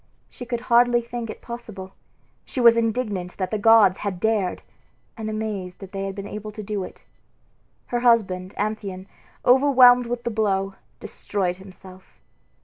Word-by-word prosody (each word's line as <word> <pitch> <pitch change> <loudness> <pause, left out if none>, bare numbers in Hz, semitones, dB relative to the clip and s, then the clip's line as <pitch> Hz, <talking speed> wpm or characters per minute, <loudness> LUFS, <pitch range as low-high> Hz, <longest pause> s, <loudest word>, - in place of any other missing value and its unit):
She 245 - -9
could 240 -1 -3
hardly 240 0 +3
think 235 -1 -6
it - - -9
possible; 215 -6 -8 0.5
she - - -6
was 235 -1 +7
indignant 220 -6 -2
that 185 -2 -3
the 215 - -1
gods 210 -3 +5
had 195 -3 -4
dared 215 -4 0 0.5
and 220 -2 -5
amazed 210 -4 -4
that 195 -2 -11
they 195 0 -4
had 195 - -6
been 200 - -6
able 210 +1 -7
to 215 0 -7
do 205 -1 -3
it. - - -11 0.8
Her 240 - -2
husband, 200 -6 +1
Amphion, 200 -3 -3 0.4
overwhelmed 250 -2 +6
with 240 0 -4
the 235 - -2
blow, 195 -3 0 0.3
destroyed 185 -3 -3
himself. 185 -1 -15
215 Hz, 155 wpm, -23 LUFS, 190-235 Hz, 0.8 s, was